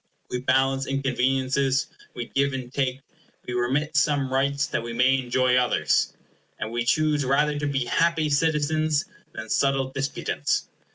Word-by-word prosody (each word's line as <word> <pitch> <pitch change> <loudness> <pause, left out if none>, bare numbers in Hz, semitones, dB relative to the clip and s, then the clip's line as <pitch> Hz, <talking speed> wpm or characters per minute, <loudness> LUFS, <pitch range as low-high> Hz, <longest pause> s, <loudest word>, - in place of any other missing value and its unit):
We 125 - -1
balance 135 +1 +1
inconveniences; 135 0 +1 0.3
we 120 - -4
give 140 +2 0
and 130 -1 -6
take; 135 -1 -1 0.4
we 125 - -5
remit 135 +6 0
some 140 -3 +2
rights, 140 +1 +1
that 145 - -2
we 115 0 -6
may 130 +3 +3
enjoy 125 0 +1
others; 100 - +1 0.4
and 110 - -4
we 120 0 -1
choose 150 +3 +2
rather 145 +3 +1
to 145 - -1
be 135 -3 -1
happy 165 +2 +1
citizens 155 0 +1 0.3
than 110 0 -7
subtle 135 +2 +1
disputants. 135 +1 -2
135 Hz, 150 wpm, -25 LUFS, 125-145 Hz, 0.4 s, may